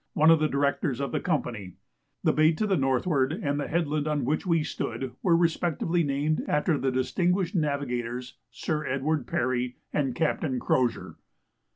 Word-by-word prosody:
one 155 +2 +5
of 165 - +5
the 155 - +2
Directors 140 -1 0
of 140 - -2
the - - 0
Company; 120 - -2 0.5
the - - +3
bay 155 +2 +4
to 185 +7 -1
the 200 -2 +2
northward, 135 0 +1
and 145 -5 -2
the 145 - -2
headland 155 -2 0
on 150 -4 0
which 155 +7 -1
we 165 -3 +2
stood, 125 -2 -4
were 170 -3 +4
respectively 170 0 +1
named 145 +2 0
after 150 +2 +2
the 135 -1 0
distinguished 175 +8 0
navigators 125 - -2 0.2
Sir 150 +5 -3
Edward 135 +1 -1
Parry 125 0 -1 0.2
and 135 -4 0
Captain 155 -4 0
Crozier. 125 -1 0
145 Hz, 165 wpm, -27 LUFS, 130-160 Hz, 0.5 s, one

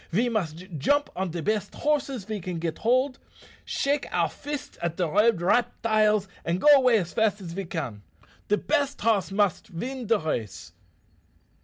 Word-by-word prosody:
"Ve 230 +8 +1
must 180 -6 -3
jump 285 - +2
on 190 0 -2
de 165 -1 -4
best 210 -1 -1
horses 280 -6 0
ve 215 0 -4
can 180 -1 -5
git 165 -1 -3
hold, 255 +3 +1 0.4
shake 280 +1 -1
our - - +2
fists 290 0 -6
at 170 -1 -2
de 180 -2 +1
red 210 +2 +3
reptiles, 215 -1 +2 0.2
and 170 +2 -1
go - - -5
away 255 -8 +6
fast 210 +4 0
as 175 -4 -7
ve 195 +2 -4
can. 135 -11 -5 0.5
De 210 - +3
best 285 0 0
hoss 210 -4 +2
must 200 -3 +1
vin 245 +7 -5
de 225 0 +4
race." 105 - -4
210 Hz, 165 wpm, -26 LUFS, 170-250 Hz, 0.5 s, away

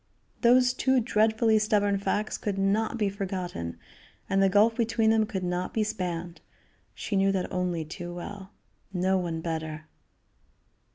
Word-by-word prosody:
Those 250 +1 +5
two 260 0 +2
dreadfully 220 -1 +3
stubborn 205 -2 +2
facts 210 +2 -1
could 200 -2 -2
not 210 +4 +1
be 210 -3 +1
forgotten, 185 - -4 0.5
and 195 0 +2
the 195 - +5
gulf 210 +4 +4
between 225 -1 +2
them 220 -1 +2
could 190 -3 -4
not 180 0 -2
be 220 - +2
spanned; 180 -5 -4 0.5
she 205 - -4
knew 195 0 +3
that 190 -2 -2
only 180 -3 -1
too 175 +2 -7
well. 190 +3 -8 0.4
No 190 0 +1
one 165 -2 -3
better. 160 -2 -4
195 Hz, 150 wpm, -27 LUFS, 180-220 Hz, 0.5 s, Those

